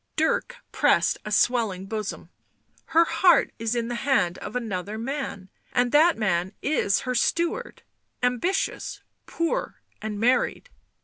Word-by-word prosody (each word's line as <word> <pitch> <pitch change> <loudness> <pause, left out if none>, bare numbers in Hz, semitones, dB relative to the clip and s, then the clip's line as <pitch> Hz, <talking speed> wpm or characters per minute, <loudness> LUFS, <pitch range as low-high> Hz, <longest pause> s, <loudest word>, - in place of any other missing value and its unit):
Dirk 320 +1 0 0.2
pressed - - +2
a 210 - -5
swelling 210 -4 +1
bosom. 215 0 -5 0.3
" - - -36
Her 335 +1 +7
heart 330 +1 +4
is 225 +1 -1
in 235 -1 -1
the 240 - -3
hand 225 -11 +1
of 210 - -7
another 215 -3 -3
man 235 -6 -4
— - - -32
and 245 0 +2
that 320 +3 +5
man 190 -3 0
is 265 -9 +1
her 255 - -2
steward, 340 - -1 0.4
ambitious, 250 +11 -1 0.2
poor 335 0 -2 0.2
and 215 -1 -4
married." 255 - +1
240 Hz, 140 wpm, -25 LUFS, 210-300 Hz, 0.4 s, Her